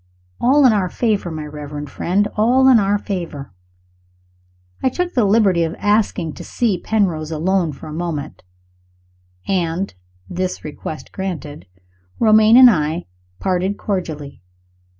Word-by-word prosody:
All 275 +3 +4
in 245 - +6
our 190 -4 0
favor, 210 -5 -1
my 155 -2 -6
reverend 150 -1 -7
friend 200 +4 0
all 250 +5 +4
in 255 -3 +7
our 200 0 +1
favor! 170 - -6 1.3
I - - +2
took 355 +6 -3
the 240 -5 +2
liberty 200 -4 +3
of 165 0 -1
asking 205 -6 0
to - - -9
see 215 -7 -1
Penrose 175 -8 -1
alone 170 +1 0
for 145 - -11
a 155 - -7
moment; 155 -3 -4 1.1
and, 180 0 -1 0.3
this 185 +1 -3
request 155 +1 -7
granted, 155 - -6 0.5
Romayne 220 +1 +5
and 255 -1 +9
I 155 -1 -1 0.3
parted 190 +1 -1
cordially. 155 - -4
185 Hz, 130 wpm, -19 LUFS, 155-215 Hz, 1.3 s, and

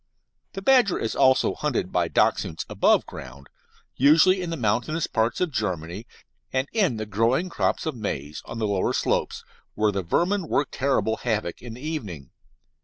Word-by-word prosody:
The 195 - -6
badger 250 -7 +4
is 115 - -3
also 130 0 +4
hunted - - -2
by - - +1
Dachshunds 80 - 0
above - - +3
ground, 70 +1 -11 0.5
usually 160 +7 +5
in 175 - -4
the 165 - -3
mountainous 120 +8 0
parts 110 +1 0
of 180 -3 0
Germany, 95 - -3 0.4
and 130 +1 0
in 195 - +1
the 110 - -4
growing 115 - +1
crops - - -1
of 160 - -1
maize, 75 - -5
on 115 - -7
the 110 - -1
lower 100 -2 0
slopes, - - -1 0.3
where 105 0 +2
the 100 -1 -2
vermin 175 - 0
work 145 - 0
terrible 110 -5 0
havoc 110 -6 -2
in 120 -2 -8
the 125 - -12
evening. 105 - -5
115 Hz, 170 wpm, -25 LUFS, 100-160 Hz, 0.5 s, usually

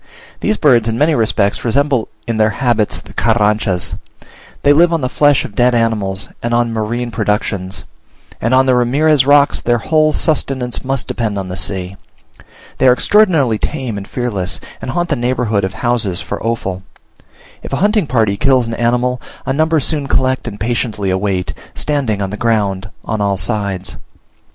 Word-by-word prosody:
These 215 - 0
birds 120 -7 +3
in 115 - -2
many 155 +4 +3
respects 110 -5 +1
resemble 135 0 +1 0.2
in 115 -1 -2
their 110 0 +3
habits 115 -2 0
the - - -15
Carranchas. 105 -5 +1 0.7
They 145 - +6
live 170 +3 +4
on 165 -2 0
the 130 - -1
flesh 145 0 +3
of - - -9
dead 120 +3 +3
animals 105 -4 0
and 120 0 -1
on 120 -1 +1
marine 115 +2 -2
productions; 100 -3 -2 0.6
and 115 - 0
on 130 0 +4
the 130 - +3
Ramirez 135 +3 +3
rocks 145 0 +4
their 120 0 +1
whole 155 +5 +2
sustenance 135 -6 -1
must 135 -1 -1
depend 110 -4 -2
on 95 -1 -4
the 90 - -4
sea. 95 +1 -2 0.8
They 130 - +4
are 125 - +7
extraordinarily 155 - +3
tame 130 -7 -3
and 100 -1 -6
fearless, 105 -8 -2 0.2
and - - -5
haunt 175 +5 -1
the 150 - +1
neighborhood 120 -4 0
of 95 +2 -3
houses 110 -6 0
for - - -5
offal. 100 -5 -2 0.8
If - - -9
a - - 0
hunting 210 -5 +2
party 110 -5 +1
kills 130 0 +3
an 115 - -4
animal, 125 +2 0 0.2
a 135 - 0
number 160 +2 +2
soon 145 0 -1
collect 130 -2 0
and 105 -3 -6
patiently 110 -3 -1
await, 95 -1 -1 0.2
standing 130 -9 -1
on 95 - -3
the 105 - -5
ground 105 -4 0 0.2
on 110 - -2
all 100 -1 +1
sides. 100 -3 -3
120 Hz, 175 wpm, -16 LUFS, 105-135 Hz, 0.8 s, are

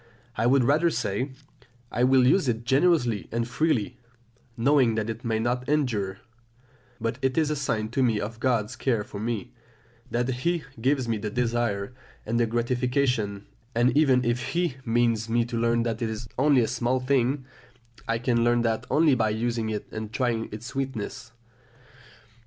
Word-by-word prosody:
I 115 - +1
would 130 +1 +4
rather 150 +7 +3
say, 115 -1 -2 0.6
"I 120 - 0
will 130 0 +5
use 145 +4 +3
it 115 -1 -1
generously 135 - +2
and 115 0 -1
freely, 125 -3 0 0.6
knowing 125 -2 +3
that 110 0 -1
it 115 +2 -9
may 115 -2 0
not 120 +3 -1
endure; 110 -10 0 0.8
but 115 +2 -2
it 130 +1 0
is 155 -2 +2
a - - 0
sign 115 -6 -1
to 125 +4 -1
me 115 -4 +2
of 110 +2 -5
God's 120 -3 0
care 115 -3 0
for 100 - -8
me, 120 +2 -3 0.6
that 120 +1 0
He 150 +6 -1 0.2
gives 130 0 +1
me 115 -2 -1
the 105 +1 -3
desire 120 -2 -1 0.3
and 115 +2 0
the 120 - +2
gratification; 120 -3 0 0.3
and 120 +2 +3
even 130 -5 +4
if 120 +2 -1
He 170 -6 0
means 115 -1 +1
me 120 +1 +2
to 120 - -5
learn 115 0 +2
that 115 -1 -3
it 115 - 0
is 110 +2 -5
only 135 -1 +4
a 115 - +1
small 125 +2 0
thing, 130 +1 +1 0.6
I 115 - +1
can 120 0 +1
learn 120 0 +3
that 115 -1 -1
only 155 -2 +4
by 115 -3 +2
using 115 +1 -1
it 105 -1 -3
and 110 -1 -5
trying 115 -1 -1
its 105 +2 -7
sweetness." 130 -4 -4
120 Hz, 175 wpm, -26 LUFS, 115-130 Hz, 0.8 s, will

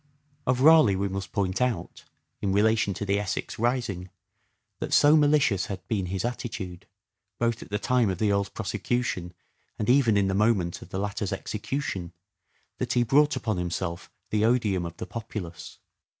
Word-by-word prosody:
Of 125 0 +2
Raleigh 155 -9 +7
we 100 +1 0
must 95 0 -5
point 100 0 -1
out, 125 -2 -2 0.4
in 100 - 0
relation 105 -1 +2
to 105 - -4
the 100 0 +1
Essex 105 +1 -4
rising, 115 -7 -1 0.7
that - - -3
so 145 +1 +6
malicious 145 -10 +3
had 95 -4 -7
been 100 -5 -1
his 95 +3 -2
attitude, 105 -7 -5 0.5
both 115 -1 0
at - - -10
the 105 - -1
time 120 0 +2
of 95 - -2
the 105 +1 +1
Earl's 100 -1 +1
prosecution 105 -3 -2 0.4
and 105 +3 +2
even 125 -6 +4
in 100 - +3
the 95 - 0
moment 100 -4 +1
of - - -11
the 95 - -4
latter's 100 0 -2
execution, 100 - -4 0.7
that - - -1
he 120 - +3
brought 145 +5 +4
upon 110 -4 -2
himself 85 0 -3 0.2
the 105 0 +2
odium 105 -7 +2
of 85 0 -10
the 110 - -5
populace. 105 -8 -7
105 Hz, 170 wpm, -27 LUFS, 95-120 Hz, 0.7 s, Raleigh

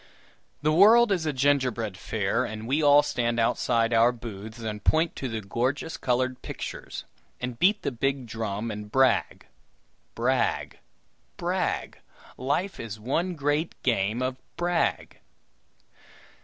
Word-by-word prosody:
The 155 - +3
world 215 +7 +6
is 175 -5 0
a - - +2
gingerbread 130 -6 +1
fair, 100 0 -1
and 110 +1 -6
we 140 +5 +1
all 145 0 +6
stand 120 -1 -1
outside 115 0 +1
our 115 +1 +5
booths 110 -2 -8
and 110 -2 -5
point 160 +1 +2
to 135 - -3
the 110 -1 -3
gorgeous 125 +10 -2
colored 130 0 -1
pictures, - - -7 0.3
and 125 -1 -5
beat 205 +3 +3
the - - -1
big 135 +2 -1
drum 110 0 -3
and 105 0 -7
brag. 135 -1 +2 0.7
Brag! 125 +2 0 0.6
brag! - - -2 0.4
Life 145 +9 -2
is 110 -2 -6
one 170 +11 -1
great 145 +2 -1
game 115 0 +1
of 130 0 -2 0.2
brag! 175 0 -1
125 Hz, 130 wpm, -26 LUFS, 115-145 Hz, 0.7 s, world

